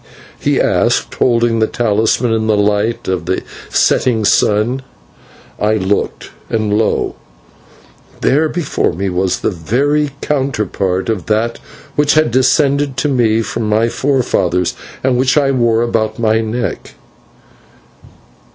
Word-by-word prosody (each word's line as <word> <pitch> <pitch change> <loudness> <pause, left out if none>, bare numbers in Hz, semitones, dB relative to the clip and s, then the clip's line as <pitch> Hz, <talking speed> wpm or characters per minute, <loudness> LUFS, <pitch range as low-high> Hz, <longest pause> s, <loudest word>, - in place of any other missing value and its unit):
he - - +1
asked, - - +1
holding 115 -2 +2
the 110 - +2
talisman 115 +1 +1
in 110 -1 0
the 110 -1 +2
light 105 +2 0
of 90 -3 -2
the 95 - -1 0.3
setting 115 -4 +2
sun. 110 +7 +2 0.8
I 105 +1 +2
looked, 100 0 -2 0.2
and 110 -2 0
lo! 110 +1 0 1.0
there 155 +4 +2
before 165 - -1
me 95 +3 -2
was 90 +1 -1
the - - 0
very 140 - 0
counterpart 105 -9 -1
of 110 -6 -2
that 110 +2 0 0.4
which 145 0 +2
had 155 -6 +3
descended 140 +2 +2
to 150 - 0
me 115 -4 +2
from 110 -1 -3
my 110 +2 +2
forefathers, 100 -11 0 0.3
and 130 -1 +2
which 130 +2 +2
I 140 -2 +3
wore 120 -3 +2
about 110 -2 -1
my 110 -1 +2
neck. 115 +2 -4
115 Hz, 130 wpm, -15 LUFS, 105-130 Hz, 1.0 s, had